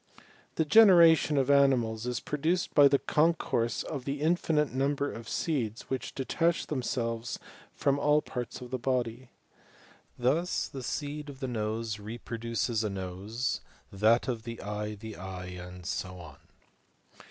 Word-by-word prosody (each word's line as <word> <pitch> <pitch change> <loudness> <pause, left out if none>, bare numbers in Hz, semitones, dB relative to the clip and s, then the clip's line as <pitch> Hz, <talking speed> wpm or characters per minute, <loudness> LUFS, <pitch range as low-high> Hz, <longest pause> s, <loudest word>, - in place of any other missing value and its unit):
The 160 - +1
generation 165 -5 +7
of 135 0 +3
animals 125 -5 +3
is 125 -2 -1
produced 160 +7 -1
by 145 -1 +8
the 140 0 +4
concourse 150 -7 +1
of 140 -5 -5
the 140 +2 -3
infinite 155 -4 +1
number 140 +2 0
of 115 0 -8
seeds 125 -9 -2
which 130 - -3
detach 165 +5 0
themselves 120 -4 -2 0.4
from 140 0 +1
all 150 +1 +4
parts 125 0 -5
of 125 - -9
the 130 - -2
body. 125 -1 -2 0.9
Thus 150 +9 +1
the 135 - -7
seed 145 +3 -4
of 135 -2 -10
the 135 - -3
nose 110 -2 -2
repro 115 +2 -7
duces 115 -1 -1
a 105 - 0
nose, 100 +6 -3 0.3
that 110 +6 +3
of 120 -3 -2
the 115 0 -7
eye 105 +1 -4
the 110 +1 -9
eye, 90 0 -7
and 90 0 -9
so 90 +1 -4
on. 80 -5 -11
125 Hz, 150 wpm, -29 LUFS, 110-145 Hz, 0.9 s, by